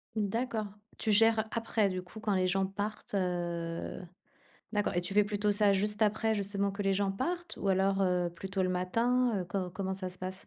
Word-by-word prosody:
D'accord. 220 +1 -1 0.3
Tu 220 - +1
gères, 225 +1 +5
après 225 -2 +1
du 185 0 -3
coup, 185 +4 -11
quand 215 -2 0
les 185 -1 +2
gens 190 +1 +1
partent? 205 +2 -4
Heu, 175 -2 -2 0.7
d'accord 210 -1 0
et 175 - +2
tu 180 +3 -3
fais 210 - +6
plutôt, 205 0 0
ça 205 0 +4
juste 210 +2 0
après, 220 +1 +2
justement 200 -1 -1
que 200 +1 -4
les 195 0 +2
gens 195 0 +1
partent 345 - -3
ou 200 - -2
alors, 195 +1 +2
heu, 180 -2 +2
plutôt 190 +2 -2
le 185 - +1
matin? 230 +8 +1
Heu, - - -3
co 180 0 -2
comment 190 +1 -3
ça 185 -1 -4
se 180 - -11
passe? 185 +1 -6
200 Hz, 205 wpm, -31 LUFS, 185-215 Hz, 0.7 s, fais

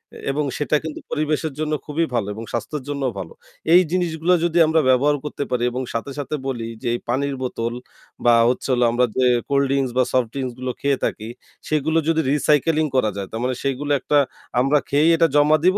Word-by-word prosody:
এ - - -9
এবং 150 +2 -1
সেটা 150 +1 0
কিন্তু 160 -1 -6
পরিবেশের 155 0 -1
জন্য 155 0 -1
খুবই 160 +2 0
ভালো 110 -4 0
এবং 110 +2 -7
স্বাস্থ্যের 130 +5 -3
জন্যও 140 -3 -1
ভালো। 90 -4 -7 0.4
এই 180 - +8
জিনিসগুলা 175 -1 +1
যদি 170 0 0
আমরা 160 0 +3
ব্যবহার 140 +3 +4
করতে 145 -1 -3
পারি 125 -1 0
এবং 125 +2 -3
সাথে, 115 +4 -3
সাথে 145 +2 -3
বলি 120 -4 -3
যে - - -4
এই 120 - -2
পানির 140 +2 0
বোতল 120 -2 -3 0.5
বা 120 - +6 0.2
হচ্ছে 125 - -2
হলো 125 -1 +3
আমরা 125 +1 +3
যে 130 - +3 0.2
কোল্ড 140 0 +3
ড্রিংকস 135 -2 0
বা 130 - +5
সফট 125 -3 +2
ড্রিংকস 130 -3 -3
গুলো 130 0 -2
খেয়ে 140 -1 +1
থাকি 110 +1 -4 0.4
সেগুলো 155 +1 +1
যদি 165 -1 +2
recycling 150 +1 +2
করা 110 -4 +3
যায় 100 -1 -4
তার 110 - -4
মানে 130 0 0
সেগুলো 140 +2 -2
একটা 145 +3 +1 0.4
আমরা 135 +3 +3
খেয়েই 150 +4 +4
এটা 165 0 +4
জমা 150 +1 +5
দিব 185 +2 +4
140 Hz, 205 wpm, -21 LUFS, 125-155 Hz, 0.5 s, এই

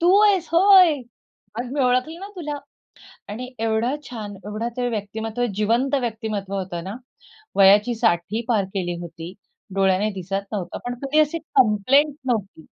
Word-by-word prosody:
तू 355 +3 +5
आहेस 390 -5 +3
होय. 370 -1 +7 0.7
अरे, 245 +1 -3
मी 285 - -1
ओळखलं 255 +6 +1
ना 395 - -7
तुला. 300 -4 -4 0.7
आणि 245 +5 -6
एवढा 225 +4 0
छान, 210 -4 -7
एवढं 215 +3 -3
ते 245 -1 0
व्यक्तिमत्व, 220 +2 -3
जिवंत 235 +7 +1
व्यक्तिमत्व 220 -4 -4
होतं 180 -3 -4
ना. 195 +4 -6 0.6
वयाची 205 +4 +6
60ही 220 -1 0
पार 215 -5 +2
केली 175 -3 -2
होती, 170 0 -8 0.4
डोळ्याने 195 +2 +2
दिसत 195 +1 -3
नव्हतं, 185 -4 -4
पण 245 - -2
कधी 290 +3 +1
अशी 310 +2 +1
कंप्लेंट 270 +1 +3
नव्हती. 205 -9 -2
225 Hz, 145 wpm, -23 LUFS, 200-270 Hz, 0.7 s, होय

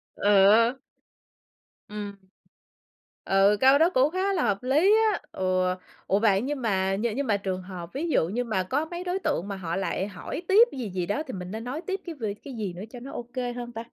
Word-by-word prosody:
Ừ. 210 +5 +4 1.1
Ừm. 205 -1 -6 1.1
Ừ, 195 +2 +4
câu 265 +2 +7
đó 330 +3 +5
cũng 275 -3 +3
khá 380 +2 0
là 335 - +1
hợp 205 0 0
lý 305 +11 +4 0.2
á. 395 - -2
Ừ, 185 -1 0 0.3
ủa, 195 - +2
vậy 205 -2 +3
nhưng 275 +1 -3
mà 195 -4 +1
nh 210 - -3
nhưng 280 -2 -2
mà 205 -2 +2
trường 190 -2 -3
hợp 180 -1 -9
ví 320 +5 -2
dụ 165 - +2
như 240 +6 -1
mà 215 -5 -1
có 285 +11 -1
mấy 345 +2 -6
đối 365 +1 -2
tượng 190 - -1
mà 200 - -4
họ 170 -3 -4
lại 195 0 -1
hỏi 200 - -6
tiếp 435 +5 +7
gì 250 -6 -5
gì 180 -2 -2
đó 285 - -1
thì - - -6
mình 180 0 -6
nên 220 +1 -5
nói 270 +7 -4
tiếp 385 0 -2
cái 335 -2 -6
về 215 -6 -3
cái 275 - -8
gì 210 -6 -4
nữa 180 +3 -8
cho 245 +1 -9
nó 270 +3 -9
ô 240 - -5
kê 245 -2 -2
hơn 240 0 -6
ta? 225 0 -6
225 Hz, 230 wpm, -26 LUFS, 195-280 Hz, 1.1 s, câu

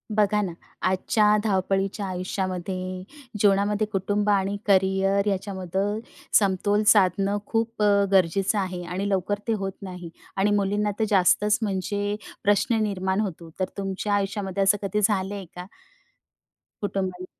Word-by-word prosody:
बघा 210 0 +3
ना, 190 -4 -2 0.3
आजच्या 210 +3 +2
धावपळीच्या 195 0 0
आयुष्यामध्ये, 185 0 -3 0.4
जीवनामध्ये, 205 +1 +2
कुटुंब 205 +1 0
आणि 200 0 +2
करिअर 195 +1 +3
याच्यामध्ये 195 +1 -2 0.4
समतोल 205 +1 +1
साधणं 195 0 +4
खूप 225 0 -2
अ, 200 -1 +4
गरजेचं 190 +2 +2
आहे 180 -2 -3
आणि 185 +3 -3
लवकर 200 +1 0
ते 225 - +2
होत 195 -2 -2
नाही 180 -3 -7 0.3
आणि 200 +2 +2
मुलींना 205 +1 +1
तर - - +2
जास्तच, 210 +2 +4
म्हणजे 205 0 -1 0.3
प्रश्न 205 +2 +2
निर्माण 190 -2 -1
होतो. 170 -5 -5
तर 185 - +2
तुमच्या 195 +1 -2
आयुष्यामध्ये 200 -1 -1
असं 195 +2 +4
कधी 205 +1 -1
झालंय 200 -1 -2
का? 180 0 -7 1.2
कुटुंबाला 190 -2 -3
195 Hz, 130 wpm, -25 LUFS, 190-205 Hz, 1.2 s, साधणं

